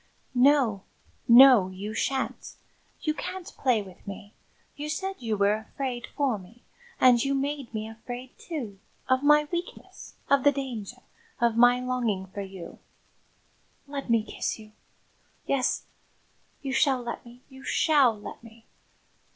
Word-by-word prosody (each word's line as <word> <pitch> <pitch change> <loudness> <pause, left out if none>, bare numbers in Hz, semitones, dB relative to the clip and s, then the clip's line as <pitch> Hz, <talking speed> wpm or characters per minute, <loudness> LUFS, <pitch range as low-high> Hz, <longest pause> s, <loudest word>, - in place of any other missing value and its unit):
"No, 250 -5 +4 0.5
no, 240 -5 +8
you 195 +3 -6
shan't 265 +4 -2 0.5
you 310 - 0
can't 370 +3 -6
play 245 -6 +1
with 190 0 -15
me! 200 +1 -8 0.4
You 295 +1 -5
said 385 +5 -3
you 225 -4 -2
were 200 +1 +3 0.2
afraid 255 -3 -4
for 270 -7 +1
me, 215 +6 -17 0.4
and 245 -2 +6
you 275 0 0
made 280 -1 -2
me 215 -1 -4
afraid, 245 +3 -8
too 240 - -6 0.3
of 260 0 +3
my 300 +1 +5
weakness 345 0 -6
of 280 -1 +3
the 285 - +6
danger 250 -4 -6 0.4
of 235 -1 +2
my 245 +1 +6
longing 245 -6 -1
for 195 +2 -7
you 190 -3 -9 0.5
" - - -39 0.3
"Let 280 -2 -6
me 230 -2 +3
kiss - - -3
you! 215 -1 -14 0.7
Yes, 270 -2 0 0.8
you 270 -1 -3
shall 265 -2 +2
let 235 - -5
me; 240 +1 -15
you 265 -1 -14
shall 270 -9 +3
let 210 - -9
me." 230 0 -16
245 Hz, 145 wpm, -27 LUFS, 220-275 Hz, 0.8 s, no